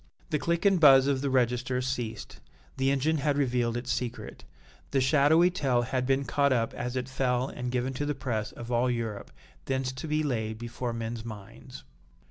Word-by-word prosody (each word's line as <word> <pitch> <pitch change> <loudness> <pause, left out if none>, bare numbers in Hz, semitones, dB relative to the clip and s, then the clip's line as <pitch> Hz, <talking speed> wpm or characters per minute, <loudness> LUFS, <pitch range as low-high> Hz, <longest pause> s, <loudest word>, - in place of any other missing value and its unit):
The 150 - +1
click 170 +4 -1
and 195 -2 +4
buzz 135 -4 +8
of 140 -2 +1
the 140 - -1
register 125 0 +1
ceased 120 -4 -4 0.4
the 135 0 +1
engine 140 +4 +1
had 145 0 0
revealed 120 -4 0
its 125 +1 -4
secret 125 -2 -4 0.4
the 135 - +1
shadowy 150 +6 +4
tale 130 -8 +1
had 130 +1 -2
been 135 +1 +1
caught 140 +3 +2
up 115 -3 +1
as 125 +1 -4
it 130 -1 -2
fell 130 -1 0
and 125 0 -5
given 125 +1 -1
to 145 +3 -3
the 150 - -1
press 115 -5 -3
of 120 +1 -8
all 120 +1 +2
Europe, 115 - -3 0.4
thence 130 -1 -1
to 130 +5 -7
be 155 0 0
laid 110 -6 -2
before 120 +1 -4
men's 115 0 -4
minds. 105 -4 -10
130 Hz, 190 wpm, -28 LUFS, 120-140 Hz, 0.4 s, buzz